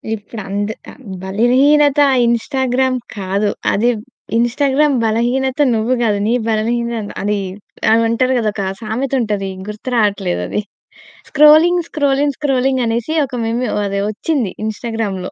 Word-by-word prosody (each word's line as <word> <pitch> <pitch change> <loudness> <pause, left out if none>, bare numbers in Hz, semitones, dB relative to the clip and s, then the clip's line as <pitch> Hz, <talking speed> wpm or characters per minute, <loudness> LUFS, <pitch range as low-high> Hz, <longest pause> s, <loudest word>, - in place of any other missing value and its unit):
ఇప్పుడు 215 +1 -9
అంద్ 205 +2 -2 0.2
ఆహ్, - - -17 0.2
బలహీనత 265 +8 +3
ఆ - - +2
ఇన్‌స్టాగ్రామ్ 255 +2 0 0.2
కాదు. 200 +2 -1 0.2
అది 235 +4 +2 0.5
ఇన్‌స్టాగ్రామ్ 275 +4 +2
బలహీనత, 245 +5 0 0.2
నువ్వు 225 +3 0
కాదు, 210 -3 +1
నీ 230 - +2 0.2
బలహీనత 230 0 -1
అది 205 +1 0 0.7
అంటారు 255 +3 +1
కదా! 220 -2 0
ఒక 200 - -3 0.2
సామెతుంటది, 220 -3 -2 0.2
గుర్తు 210 +4 -6
రాట్లేదు 200 - 0
అది. 210 - -2 0.7
స్క్రోలింగ్, 315 +4 +6
స్క్రోలింగ్, 285 -1 +1
స్క్రోలింగ్ 265 -2 +1
అనేసి 235 +7 -1
ఒక 260 -2 -8
మీమ్ 230 +2 -1 0.2
అది 200 0 -2
వచ్చింది 235 - -2
ఇన్‌స్టాగ్రామ్‌లో. 220 -4 -4
235 Hz, 120 wpm, -17 LUFS, 210-265 Hz, 0.7 s, స్క్రోలింగ్